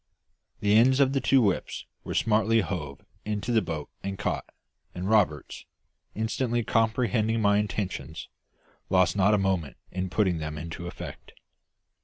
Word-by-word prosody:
The 105 Hz, 0 st, +3 dB
ends 130 Hz, +4 st, +5 dB
of 135 Hz, -1 st, +4 dB
the 135 Hz, -, +1 dB
two 130 Hz, 0 st, +4 dB
whips 100 Hz, -3 st, -1 dB, 0.2 s
were -, -, -5 dB
smartly 110 Hz, +1 st, +3 dB
hove 75 Hz, -9 st, -5 dB, 0.2 s
into 105 Hz, +2 st, -2 dB
the 115 Hz, -2 st, +4 dB
boat 80 Hz, -5 st, -4 dB
and 95 Hz, 0 st, -4 dB
caught, -, -, -3 dB, 0.4 s
and 90 Hz, +1 st, -3 dB
Roberts, 100 Hz, -8 st, +1 dB, 0.5 s
instantly 115 Hz, +2 st, 0 dB
comprehending 115 Hz, 0 st, +1 dB
my 100 Hz, -1 st, +4 dB
intentions, 95 Hz, -6 st, -4 dB, 0.6 s
lost 95 Hz, -2 st, +3 dB
not 100 Hz, +1 st, +4 dB
a -, -, +2 dB
moment 95 Hz, -6 st, -1 dB
in 95 Hz, 0 st, -3 dB
putting 95 Hz, -4 st, +1 dB
them 75 Hz, 0 st, -4 dB
into 85 Hz, +2 st, -6 dB
effect. -, -, -9 dB
100 Hz, 145 wpm, -27 LUFS, 90-110 Hz, 0.6 s, ends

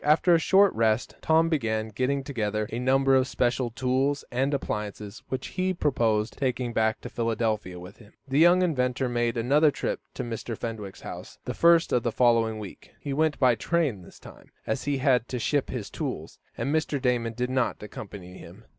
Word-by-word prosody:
After 155 Hz, +4 st, +4 dB
a 165 Hz, -, +5 dB
short 195 Hz, +4 st, +4 dB
rest, 110 Hz, 0 st, +1 dB
Tom 160 Hz, +1 st, +3 dB
began 110 Hz, -8 st, -1 dB
getting 130 Hz, +5 st, -1 dB
together 110 Hz, -6 st, -2 dB
a 115 Hz, -, -3 dB
number 135 Hz, +1 st, +3 dB
of 130 Hz, 0 st, +3 dB
special 125 Hz, -1 st, 0 dB
tools 130 Hz, +4 st, 0 dB
and 130 Hz, +3 st, 0 dB
appliances, 105 Hz, -5 st, -4 dB
which 130 Hz, -1 st, -4 dB
he 185 Hz, 0 st, -1 dB
proposed 115 Hz, -9 st, 0 dB
taking 125 Hz, -3 st, -1 dB
back 110 Hz, -1 st, +1 dB
to -, -, -7 dB
Philadelphia 110 Hz, -5 st, -2 dB
with 90 Hz, +4 st, -11 dB
him. 105 Hz, -3 st, -18 dB
The 135 Hz, +2 st, +1 dB
young 175 Hz, +3 st, +6 dB
inventor 130 Hz, -6 st, 0 dB
made 120 Hz, -1 st, 0 dB
another 145 Hz, +7 st, +4 dB
trip -, -, -3 dB, 0.2 s
to 130 Hz, -, -3 dB
Mr. 115 Hz, -1 st, -5 dB
Fenwick's 110 Hz, -4 st, -6 dB
house -, -, -9 dB
the -, -, -3 dB
first 170 Hz, 0 st, +4 dB
of 125 Hz, -, +3 dB
the 120 Hz, -, -1 dB
following 115 Hz, -2 st, +2 dB
week. 105 Hz, -3 st, -10 dB
He 140 Hz, -, -4 dB
went 155 Hz, +1 st, +1 dB
by 130 Hz, -3 st, +4 dB
train 140 Hz, -, 0 dB
this 90 Hz, -, -15 dB
time, -, -, -15 dB, 0.2 s
as -, -, -2 dB
he 145 Hz, -1 st, 0 dB
had 130 Hz, -3 st, +2 dB
to 125 Hz, -, -4 dB
ship 140 Hz, +4 st, 0 dB
his 115 Hz, -6 st, -5 dB
tools, -, -, -5 dB, 0.2 s
and 140 Hz, -, -1 dB
Mr. 155 Hz, -2 st, 0 dB
Damon 120 Hz, -3 st, 0 dB
did 125 Hz, +2 st, -2 dB
not 130 Hz, -4 st, -1 dB
accompany 95 Hz, -3 st, -9 dB
him. 95 Hz, +7 st, -13 dB
125 Hz, 190 wpm, -26 LUFS, 110-140 Hz, 0.2 s, young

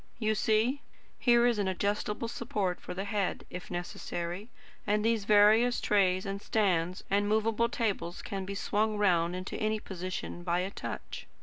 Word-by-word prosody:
You 220 Hz, -2 st, +1 dB
see? 220 Hz, +6 st, +2 dB, 0.4 s
Here 240 Hz, -1 st, +5 dB
is 240 Hz, -3 st, +2 dB
an 200 Hz, -, +1 dB
adjustable 205 Hz, +4 st, -1 dB
support 215 Hz, -6 st, -2 dB
for -, -, -7 dB
the 195 Hz, -, -2 dB
head, 200 Hz, -1 st, -2 dB
if 180 Hz, -2 st, -7 dB
necessary; 175 Hz, +2 st, -4 dB, 0.4 s
and 210 Hz, +1 st, +2 dB
these 225 Hz, -3 st, +1 dB
various 215 Hz, +4 st, +5 dB
trays 185 Hz, -3 st, +2 dB
and 195 Hz, 0 st, -4 dB
stands 185 Hz, -5 st, +1 dB
and 205 Hz, +1 st, +2 dB
movable 220 Hz, +2 st, +2 dB
tables 205 Hz, -7 st, -2 dB
can 195 Hz, -1 st, -4 dB
be 200 Hz, +1 st, -5 dB
swung 210 Hz, +2 st, 0 dB
round 175 Hz, -4 st, +2 dB
into 185 Hz, +1 st, -5 dB
any 215 Hz, 0 st, 0 dB
position 185 Hz, -3 st, -5 dB
by 175 Hz, 0 st, 0 dB
a 190 Hz, +2 st, -3 dB
touch. -, -, -6 dB
205 Hz, 165 wpm, -30 LUFS, 185-220 Hz, 0.4 s, Here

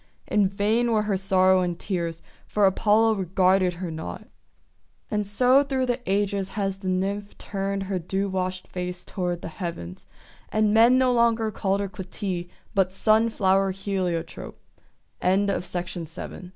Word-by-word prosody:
In 205 Hz, -2 st, +2 dB
vain 215 Hz, +5 st, +1 dB
were 215 Hz, -1 st, +2 dB
her 210 Hz, -2 st, 0 dB
sorrow 185 Hz, -1 st, +3 dB
and 175 Hz, -2 st, -1 dB
tears, 170 Hz, -4 st, -3 dB, 0.2 s
for 210 Hz, -1 st, +2 dB
Apollo 215 Hz, +3 st, +4 dB
regarded 185 Hz, -1 st, +2 dB
her 175 Hz, -1 st, -5 dB
not. 125 Hz, -, -7 dB, 0.8 s
And 210 Hz, -1 st, -1 dB
so 250 Hz, +6 st, +4 dB
through 270 Hz, -2 st, 0 dB
the 245 Hz, 0 st, -1 dB
ages 195 Hz, -1 st, 0 dB
has 195 Hz, -2 st, -1 dB
the 195 Hz, -1 st, -7 dB
Nymph 195 Hz, +2 st, -2 dB
turned 195 Hz, 0 st, -3 dB
her 190 Hz, -1 st, -2 dB
dew 190 Hz, +4 st, -2 dB
washed 185 Hz, -1 st, -3 dB
face 180 Hz, 0 st, -5 dB
toward 175 Hz, -3 st, -3 dB
the -, -, -4 dB
heavens; 90 Hz, -, -6 dB, 0.4 s
and 215 Hz, -1 st, +2 dB
men 230 Hz, +3 st, +6 dB
no 255 Hz, -1 st, +3 dB
longer 230 Hz, -2 st, +2 dB
call 195 Hz, -1 st, 0 dB
her 200 Hz, 0 st, -2 dB
Clytie, 185 Hz, -1 st, -5 dB, 0.2 s
but 190 Hz, -2 st, +2 dB
Sun 220 Hz, +4 st, +3 dB
flower 195 Hz, -2 st, +2 dB
He 185 Hz, -3 st, -1 dB
195 Hz, 140 wpm, -25 LUFS, 185-210 Hz, 0.8 s, men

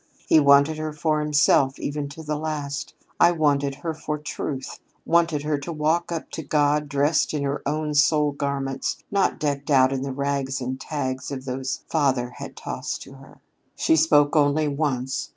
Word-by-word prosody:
He 160 Hz, -, +6 dB
wanted 140 Hz, +2 st, +5 dB
her 155 Hz, -1 st, -3 dB
for 155 Hz, 0 st, 0 dB
himself 145 Hz, -2 st, +3 dB
even 145 Hz, 0 st, -4 dB
to 160 Hz, +3 st, -10 dB
the 150 Hz, 0 st, -2 dB
last: 145 Hz, -2 st, -4 dB, 0.2 s
I -, -, +7 dB
wanted 145 Hz, -3 st, +1 dB
her 165 Hz, +3 st, -4 dB
for 150 Hz, -1 st, -4 dB
Truth 145 Hz, -2 st, -5 dB, 0.3 s
wanted 165 Hz, -3 st, +2 dB
her 150 Hz, -1 st, 0 dB
to 140 Hz, +4 st, -6 dB
walk 160 Hz, +3 st, 0 dB
up 165 Hz, -2 st, -5 dB
to -, -, -5 dB
God 150 Hz, 0 st, +1 dB
dressed 145 Hz, +2 st, +1 dB
in 145 Hz, -, -1 dB
her 140 Hz, +1 st, -2 dB
own 150 Hz, +1 st, -1 dB
soul 150 Hz, 0 st, +3 dB
garments, 140 Hz, -1 st, -2 dB
not 200 Hz, -1 st, +1 dB
decked 140 Hz, -1 st, -2 dB
out 130 Hz, -2 st, +5 dB
in 135 Hz, -, -2 dB
the 135 Hz, 0 st, -3 dB
rags 140 Hz, 0 st, -2 dB
and 130 Hz, +1 st, -4 dB
tags 130 Hz, -4 st, -3 dB
of 135 Hz, -2 st, -6 dB
those 130 Hz, 0 st, -3 dB
father 135 Hz, -6 st, +1 dB
had -, -, -8 dB
tossed -, -, -5 dB
to -, -, -13 dB
her. -, -, -16 dB, 0.3 s
"She 160 Hz, -, +3 dB
spoke 150 Hz, -1 st, +4 dB
only 150 Hz, +1 st, +3 dB
once. 140 Hz, -3 st, -2 dB
145 Hz, 180 wpm, -24 LUFS, 140-155 Hz, 0.3 s, I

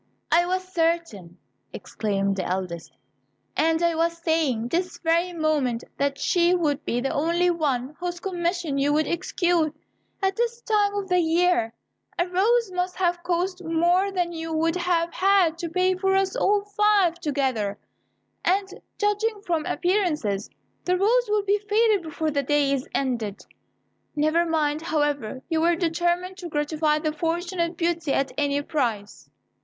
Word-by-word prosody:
"I 345 Hz, +1 st, +4 dB
was 370 Hz, +1 st, -1 dB
certain," 330 Hz, -, -1 dB, 0.4 s
exclaimed 200 Hz, -2 st, -2 dB
the 190 Hz, -, -1 dB
eldest, 180 Hz, -2 st, -4 dB, 0.6 s
"and 325 Hz, +2 st, +2 dB
I 340 Hz, 0 st, +3 dB
was 335 Hz, +1 st, 0 dB
saying, 315 Hz, -9 st, 0 dB
this 360 Hz, +4 st, -1 dB
very 340 Hz, +2 st, +1 dB
moment, 300 Hz, -8 st, 0 dB
that 280 Hz, 0 st, 0 dB
she 350 Hz, +3 st, +2 dB
would 300 Hz, -5 st, 0 dB
be 240 Hz, -, 0 dB
the 270 Hz, -, -1 dB
only 340 Hz, +4 st, +2 dB
one 285 Hz, -4 st, -1 dB
whose 350 Hz, 0 st, -4 dB
commission 345 Hz, -5 st, -2 dB
you 285 Hz, +1 st, +2 dB
would 310 Hz, +1 st, +2 dB
execute. 340 Hz, -2 st, 0 dB, 0.5 s
At 385 Hz, 0 st, +1 dB
this 470 Hz, 0 st, -1 dB
time 415 Hz, -3 st, +1 dB
of 400 Hz, -1 st, -2 dB
the 360 Hz, -1 st, +2 dB
year, 330 Hz, -8 st, +2 dB, 0.4 s
a 350 Hz, -, +1 dB
rose 420 Hz, +4 st, +2 dB
must 360 Hz, 0 st, -2 dB
have 350 Hz, -1 st, 0 dB
cost 360 Hz, +1 st, -1 dB
more 345 Hz, +4 st, +2 dB
than 355 Hz, -2 st, -1 dB
you 325 Hz, -1 st, -5 dB
would 325 Hz, +1 st, +1 dB
have 345 Hz, -1 st, 0 dB
had 375 Hz, -4 st, +3 dB
to 340 Hz, -, -3 dB
pay 370 Hz, +2 st, +2 dB
for 385 Hz, +1 st, +1 dB
us 390 Hz, +3 st, +1 dB
all 415 Hz, -4 st, +2 dB
five 410 Hz, -4 st, +2 dB
together; 260 Hz, -, -1 dB, 0.7 s
and, 390 Hz, +2 st, +2 dB, 0.3 s
judging 415 Hz, +1 st, 0 dB
from 330 Hz, -3 st, -1 dB
appearances, 330 Hz, -, 0 dB, 0.3 s
the 365 Hz, 0 st, +1 dB
rose 460 Hz, +4 st, +2 dB
will 420 Hz, -1 st, +2 dB
be 400 Hz, +1 st, +2 dB
faded 420 Hz, 0 st, +2 dB
before 315 Hz, -1 st, -3 dB
the 285 Hz, -1 st, +1 dB
day 285 Hz, 0 st, +1 dB
is 270 Hz, -1 st, -3 dB
ended: 235 Hz, -7 st, -2 dB, 0.7 s
never 310 Hz, +3 st, +2 dB
mind, 310 Hz, -2 st, 0 dB
however, 290 Hz, -6 st, -1 dB
you 320 Hz, -2 st, 0 dB
were 340 Hz, +1 st, +3 dB
determined 345 Hz, +2 st, -1 dB
to 355 Hz, -4 st, -7 dB
gratify 300 Hz, 0 st, 0 dB
the 305 Hz, 0 st, -2 dB
fortunate 340 Hz, +2 st, -2 dB
Beauty 335 Hz, -3 st, 0 dB
at 275 Hz, 0 st, 0 dB
any 285 Hz, -1 st, 0 dB
price." 230 Hz, -10 st, -3 dB
335 Hz, 155 wpm, -24 LUFS, 295-365 Hz, 0.7 s, I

